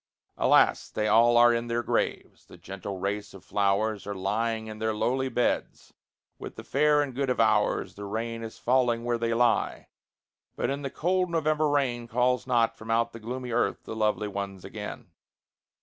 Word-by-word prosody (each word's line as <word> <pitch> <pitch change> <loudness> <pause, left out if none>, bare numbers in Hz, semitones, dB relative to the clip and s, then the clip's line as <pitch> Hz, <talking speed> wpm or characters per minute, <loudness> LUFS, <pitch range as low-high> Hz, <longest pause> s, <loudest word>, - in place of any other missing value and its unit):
Alas! - - +3
they 105 0 -1
all 115 +2 +5
are 120 0 +7
in 115 0 -2
their 120 0 -1
graves; - - -2
the - - -14
gentle 95 +1 -7
race 100 +2 -3
of 95 - -14
flowers 100 0 0
Are 100 - -4
lying 110 +4 -1
in 110 -1 -8
their 110 0 -1
lowly 130 +4 0
beds, 125 - -2 0.5
with - - -8
the - - -9
fair 150 +1 +3
and 135 -3 -6
good 135 +1 -1
of 125 - 0
ours. 110 -2 +2
The 100 - -8
rain 115 +3 -4
is 115 -1 -8
falling 120 -2 +1
where 120 -1 -1
they 115 0 0
lie, 120 0 +1 0.7
but 140 +3 -2
the 135 - -3
cold 180 +5 0
November 155 -2 +1
rain 125 -5 0
Calls 125 +2 +1
not 120 -3 +2
from 110 - -12
out 115 +1 +1
the 115 - -8
gloomy 125 +2 -5
earth 120 - 0
the - - -7
lovely 105 -1 0
ones 100 -2 -5
again. - - -8
115 Hz, 180 wpm, -27 LUFS, 105-125 Hz, 0.7 s, are